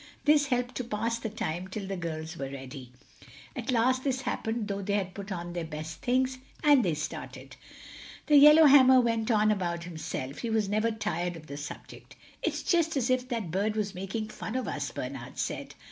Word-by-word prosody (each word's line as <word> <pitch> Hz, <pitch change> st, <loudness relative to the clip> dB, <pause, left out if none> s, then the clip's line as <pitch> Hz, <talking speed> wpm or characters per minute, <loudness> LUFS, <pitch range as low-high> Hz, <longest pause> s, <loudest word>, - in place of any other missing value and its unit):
This 295 Hz, -1 st, +5 dB
helped 250 Hz, -1 st, -1 dB
to 255 Hz, -, -2 dB
pass 230 Hz, 0 st, -2 dB
the 225 Hz, -, -4 dB
time 185 Hz, -5 st, -4 dB
till 195 Hz, +1 st, -5 dB
the 195 Hz, 0 st, -4 dB
girls 160 Hz, -2 st, -5 dB
were 135 Hz, -4 st, -5 dB
ready. 135 Hz, -1 st, -9 dB, 0.6 s
At 245 Hz, -1 st, -5 dB
last 255 Hz, +2 st, +2 dB
this 265 Hz, -2 st, 0 dB
happened 225 Hz, -4 st, -2 dB
though 200 Hz, -1 st, -3 dB
they 200 Hz, +1 st, -2 dB
had 190 Hz, -3 st, -2 dB
put 200 Hz, 0 st, -8 dB
on 175 Hz, -1 st, -4 dB
their 175 Hz, -1 st, -3 dB
best 155 Hz, 0 st, -7 dB
things, 255 Hz, +1 st, +1 dB, 0.2 s
and 290 Hz, -4 st, +6 dB
they 170 Hz, -5 st, +1 dB
started. 150 Hz, 0 st, -6 dB, 0.7 s
The 295 Hz, -, +4 dB
yellowhammer 285 Hz, -3 st, +8 dB
went 230 Hz, -2 st, +1 dB
on 215 Hz, -2 st, +4 dB
about 175 Hz, -4 st, -1 dB
himself—he 160 Hz, -, -5 dB
was 220 Hz, -2 st, +1 dB
never 215 Hz, +3 st, +1 dB
tired 180 Hz, -6 st, -2 dB
of 160 Hz, -1 st, -11 dB
the 140 Hz, -, -8 dB
subject. 145 Hz, 0 st, -9 dB, 0.3 s
"It's -, -, -2 dB
just 330 Hz, -4 st, +2 dB
as 255 Hz, -1 st, +1 dB
if 255 Hz, 0 st, 0 dB
that 225 Hz, -, -3 dB
bird 205 Hz, +4 st, 0 dB
was 210 Hz, -2 st, -1 dB
making 195 Hz, +4 st, -4 dB
fun 220 Hz, -, -6 dB
of 255 Hz, -, -1 dB
us," -, -, -3 dB
Bernard -, -, -7 dB
said. -, -, -4 dB
215 Hz, 190 wpm, -29 LUFS, 175-250 Hz, 0.7 s, yellowhammer